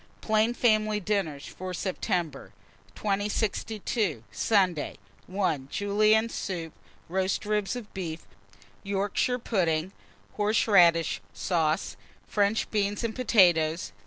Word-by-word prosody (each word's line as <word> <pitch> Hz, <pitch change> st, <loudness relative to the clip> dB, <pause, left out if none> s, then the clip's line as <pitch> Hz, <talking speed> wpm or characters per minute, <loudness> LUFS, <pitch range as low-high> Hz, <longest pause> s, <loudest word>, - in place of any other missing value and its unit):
PLAIN 220 Hz, +2 st, +1 dB
FAMILY 215 Hz, -3 st, +2 dB
DINNERS 185 Hz, -8 st, -2 dB
FOR 185 Hz, 0 st, -6 dB
SEPTEMBER. 170 Hz, -5 st, -3 dB, 0.4 s
2062. 205 Hz, -, -1 dB
Sunday. 185 Hz, -8 st, +1 dB, 0.3 s
1. 185 Hz, -8 st, -1 dB
Julienne 215 Hz, +4 st, +3 dB
soup. 175 Hz, -7 st, -5 dB, 0.3 s
2. 170 Hz, -, -14 dB
Roast 190 Hz, +1 st, 0 dB
ribs 210 Hz, -2 st, 0 dB
of 240 Hz, -4 st, -8 dB
beef, 170 Hz, -4 st, -5 dB, 0.6 s
Yorkshire 200 Hz, +5 st, 0 dB
pudding, 180 Hz, -7 st, 0 dB, 0.5 s
horseradish 195 Hz, -6 st, +4 dB
sauce, 160 Hz, -3 st, 0 dB, 0.3 s
French 205 Hz, +1 st, +1 dB
beans, 205 Hz, 0 st, 0 dB
and 230 Hz, -1 st, -2 dB
potatoes. 175 Hz, -9 st, +3 dB
200 Hz, 100 wpm, -27 LUFS, 170-215 Hz, 0.6 s, horseradish